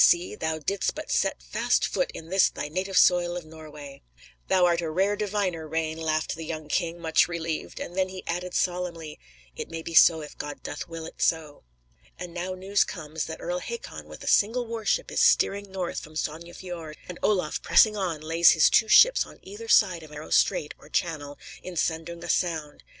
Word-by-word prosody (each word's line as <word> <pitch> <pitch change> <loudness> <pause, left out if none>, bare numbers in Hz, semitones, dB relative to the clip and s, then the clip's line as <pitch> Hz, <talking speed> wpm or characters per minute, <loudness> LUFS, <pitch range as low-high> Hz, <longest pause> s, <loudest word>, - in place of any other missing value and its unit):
See; 175 +1 +4
thou 160 0 -2
didst 195 +6 -1
but - - -6
set - - 0
fast - - +1
foot - - -1
in 165 - -9
this 190 0 +4
thy 150 - -5
native 185 +4 -2
soil 175 -1 +4
of 175 - -7
Norway." 150 -3 -11 0.5
"Thou 185 -1 +4
art 170 -1 +2
a 165 - -3
rare 190 +6 +1
diviner, 200 -6 -2
Rane," 160 0 -2
laughed 155 -1 -1
the 165 - -7
young 155 -1 -6
king, 170 +2 -1
much 160 -1 +3
relieved, 165 -2 -4
and 175 - -6
then 190 0 +1
he 185 0 -9
added 180 +1 -3
solemnly: 175 -4 -2 0.4
"It - - -6
may 165 0 -6
be 165 - -6
so 160 0 +7
if 150 - -10
God 145 0 -6
doth - - -6
will 165 -1 -7
it - - -10
so." 155 - -1 0.5
And 180 -1 -7
now 180 +2 -4
news 195 +2 +2
comes 155 -2 -5
that 160 - -7
Earl 175 +1 -2
Hakon, 470 - -7
with - - -11
a - - -8
single 235 +4 +3
war 225 -1 -6
ship, - - 0
is - - -1
steering 200 0 +3
north 185 -2 -3
from 155 +1 -13
Sogne 160 +2 -4
Fiord; 170 -4 -8
and 180 - -8
Olaf, 185 -7 0
pressing 215 -1 +5
on, 175 -6 -2
lays 165 +2 +5
his 160 - +5
two 220 - +4
ships - - +6
on - - -14
either 205 +4 -9
side 185 -7 +4
of 155 - -12
a 150 - -12
narrow 150 +1 -9
strait, 150 - +2
or - - -16
channel, 145 -4 -2 0.2
in 185 - -8
Sandunga 170 +1 -2
Sound. 160 -4 -2
170 Hz, 205 wpm, -26 LUFS, 160-185 Hz, 0.5 s, so